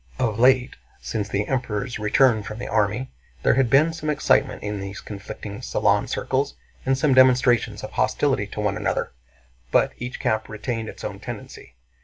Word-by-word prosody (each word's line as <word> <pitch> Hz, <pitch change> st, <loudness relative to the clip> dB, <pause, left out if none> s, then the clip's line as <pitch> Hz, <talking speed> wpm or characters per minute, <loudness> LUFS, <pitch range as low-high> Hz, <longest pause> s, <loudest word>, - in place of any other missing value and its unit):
Of 115 Hz, -3 st, -1 dB
late, 125 Hz, 0 st, +4 dB, 0.2 s
since 105 Hz, -2 st, -3 dB
the 100 Hz, +1 st, 0 dB
Emperor's 125 Hz, -2 st, -2 dB
return 110 Hz, +2 st, +3 dB
from 105 Hz, +1 st, -7 dB
the 120 Hz, -, -5 dB
army, 110 Hz, +4 st, 0 dB, 0.3 s
there -, -, +4 dB
had 130 Hz, -1 st, +2 dB
been 155 Hz, +6 st, +4 dB
some 155 Hz, -1 st, -4 dB
excitement 145 Hz, -3 st, +2 dB
in 105 Hz, -1 st, -3 dB
these 100 Hz, +1 st, -6 dB
conflicting 100 Hz, 0 st, -8 dB
salon -, -, +1 dB
circles 135 Hz, +2 st, -1 dB, 0.3 s
and 135 Hz, 0 st, +3 dB
some 135 Hz, +1 st, +3 dB
demonstrations 125 Hz, -4 st, +4 dB
of 105 Hz, -, -6 dB
hostility 130 Hz, -4 st, +1 dB
to 105 Hz, -, -5 dB
one 105 Hz, -1 st, 0 dB
another, 105 Hz, -, -1 dB, 0.6 s
but -, -, +3 dB
each 125 Hz, +1 st, -5 dB
camp 110 Hz, 0 st, -1 dB
retained 110 Hz, +1 st, -4 dB
its -, -, -10 dB
own -, -, -5 dB
tendency. -, -, -9 dB
120 Hz, 170 wpm, -23 LUFS, 105-130 Hz, 0.6 s, late